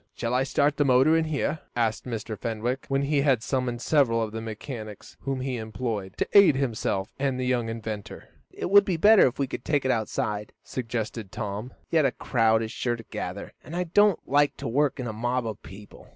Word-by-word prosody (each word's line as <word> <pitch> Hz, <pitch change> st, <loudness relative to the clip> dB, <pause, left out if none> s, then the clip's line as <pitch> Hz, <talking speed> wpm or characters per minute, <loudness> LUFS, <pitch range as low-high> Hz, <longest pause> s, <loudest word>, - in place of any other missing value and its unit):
"Shall 115 Hz, +1 st, -2 dB
I 125 Hz, -, +3 dB
start 140 Hz, +2 st, +1 dB
the 145 Hz, -, +3 dB
motor 135 Hz, +4 st, +5 dB
in 165 Hz, 0 st, +2 dB
here?" 155 Hz, 0 st, -1 dB, 0.2 s
asked 115 Hz, -2 st, 0 dB
Mr. 115 Hz, -2 st, -4 dB
Fenwick, 115 Hz, +5 st, -3 dB
when 135 Hz, 0 st, 0 dB
he 140 Hz, 0 st, +1 dB
had 135 Hz, -6 st, +2 dB
summoned 125 Hz, -3 st, -2 dB
several 135 Hz, -7 st, +3 dB
of 110 Hz, -, -4 dB
the 110 Hz, +1 st, -5 dB
machinists 110 Hz, -1 st, -8 dB
whom 135 Hz, -2 st, -3 dB
he 130 Hz, -1 st, -2 dB
employed, 110 Hz, -3 st, -4 dB
to -, -, 0 dB
aid 200 Hz, -8 st, +8 dB
himself 110 Hz, -7 st, -1 dB
and 135 Hz, -2 st, 0 dB
the 130 Hz, -, -1 dB
young 125 Hz, -2 st, 0 dB
inventor. 110 Hz, -2 st, -6 dB, 0.2 s
"It -, -, -5 dB
would 200 Hz, 0 st, +8 dB
be 185 Hz, -4 st, -1 dB
better 210 Hz, +2 st, +7 dB
if 125 Hz, -, -4 dB
we 140 Hz, -, +1 dB
could 130 Hz, -, -6 dB
take 145 Hz, -3 st, 0 dB
it 130 Hz, -, +3 dB
outside," 105 Hz, -2 st, -2 dB
suggested 115 Hz, -4 st, -4 dB
Tom, 105 Hz, +3 st, -5 dB, 0.2 s
"yet 160 Hz, -2 st, +4 dB
a 135 Hz, -, +3 dB
crowd 115 Hz, -3 st, +2 dB
is 110 Hz, -, -5 dB
sure 120 Hz, -1 st, -1 dB
to 115 Hz, -, -10 dB
gather, -, -, -5 dB
and 165 Hz, -, -8 dB
I 180 Hz, -, 0 dB
don't 200 Hz, +2 st, +4 dB
like 145 Hz, +1 st, +2 dB
to -, -, -5 dB
work 140 Hz, +4 st, +1 dB
in 125 Hz, -, -3 dB
a 110 Hz, -, -4 dB
mob 120 Hz, +2 st, -1 dB
of 110 Hz, -2 st, -5 dB
people." 100 Hz, +2 st, -13 dB
125 Hz, 215 wpm, -26 LUFS, 110-140 Hz, 0.2 s, aid